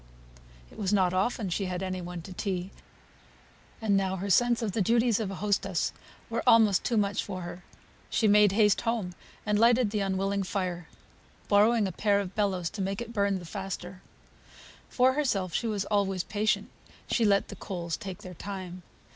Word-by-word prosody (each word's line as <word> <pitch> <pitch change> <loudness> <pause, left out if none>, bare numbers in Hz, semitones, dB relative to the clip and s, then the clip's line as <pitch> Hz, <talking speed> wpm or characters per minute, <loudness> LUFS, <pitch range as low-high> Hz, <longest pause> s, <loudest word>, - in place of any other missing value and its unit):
it - - -13
was 195 -2 0
not 185 -3 +3
often 200 +3 0
she 190 +3 -1
had 180 0 -3
any 185 -1 -3
one 175 -1 -7
to 185 - -9
tea; 185 -1 -3 1.1
and 215 -3 +1
now 190 -1 +1
her 195 +2 -3
sense 240 +3 +3
of 215 - -1
the 215 - -1
duties 230 +2 +3
of 215 -4 -2
a 195 - -5
hostess 195 -3 0 0.3
were 230 - -2
almost 215 -5 +5
too 235 - 0
much 200 -1 +1
for 185 -2 -6
her. 175 +1 -8 0.5
She 220 - +2
made 210 -1 +6
haste 210 -1 +4
home, 230 -6 -2 0.3
and 210 -1 +1
lighted 235 -1 +4
the 210 - -1
unwilling 195 0 0
fire, 185 -3 -3 0.6
borrowing 215 +1 +4
a - - -3
pair 200 +3 +2
of 195 -2 -4
bellows 190 -5 -1
to 205 - -5
make 195 +1 -2
it 235 0 -6
burn 200 -2 +1
the 175 - -9
faster. 190 0 -6 0.9
For 255 +1 +3
herself 205 - 0
she 235 - 0
was 205 -3 -1
always 195 -3 0
patient; 215 +1 -1 0.4
she 235 - +1
let 200 -2 +3
the - - -7
coals 170 -4 -4
take 190 -2 -8
their 185 - -8
time. 185 0 -7
200 Hz, 185 wpm, -28 LUFS, 185-215 Hz, 1.1 s, made